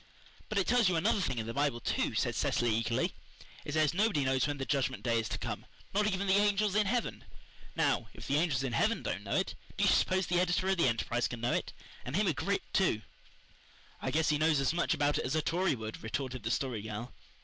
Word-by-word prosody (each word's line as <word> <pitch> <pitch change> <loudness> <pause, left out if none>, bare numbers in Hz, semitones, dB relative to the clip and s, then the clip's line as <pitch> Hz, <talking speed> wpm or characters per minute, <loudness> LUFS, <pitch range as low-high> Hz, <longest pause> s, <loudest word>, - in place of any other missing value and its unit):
"But 215 - -2
it 195 - +3
tells 235 -4 +4
you 180 - +1
another 200 +5 +2
thing 130 -8 -1
in 110 - -2
the 115 - -4
Bible, 140 -3 0
too," - - -1
said - - +1
Cecily 120 -2 +1
eagerly. 115 +1 0 0.5
"It 150 - -5
says 155 -1 +3
nobody 200 -6 +2
knows 130 +1 +2
when 145 -1 -2
the 135 - -3
Judgment 130 -2 -1
Day 115 -2 +2
is 115 - -3
to - - -2
come - - -5 0.3
not 210 +1 +2
even 190 +1 -1
the 190 - +3
angels 205 0 +3
in 210 -1 +3
heaven. 240 +2 -1 0.5
Now, - - +1
if - - -10
the 140 - +1
angels 150 -5 +1
in 130 -3 -2
heaven - - +1
don't - - -3
know - - -2
it, - - 0 0.2
do - - +1
you - - +5
suppose 185 0 +2
the 175 +1 +1
editor 180 +1 +1
of 190 - +2
the 165 - +4
Enterprise 120 +1 0
can 120 - -6
know 120 +1 0
it - - -1 0.3
and 125 - -4
him 210 +3 +2
a 175 - +2
Grit, 200 +7 -1
too?" 140 - +2 1.0
"I - - -1
guess 160 +1 +1
he 150 -1 +2
knows 155 -2 +3
as 135 +3 +1
much 175 - +1
about 145 0 +1
it - - -2
as 130 - -1
a 155 - +2
Tory 175 -1 +1
would," 110 -2 -7
retorted 130 +2 -4
the 110 - -3
Story 120 -2 -1
Girl. 110 +3 -6
150 Hz, 245 wpm, -32 LUFS, 125-190 Hz, 1.0 s, you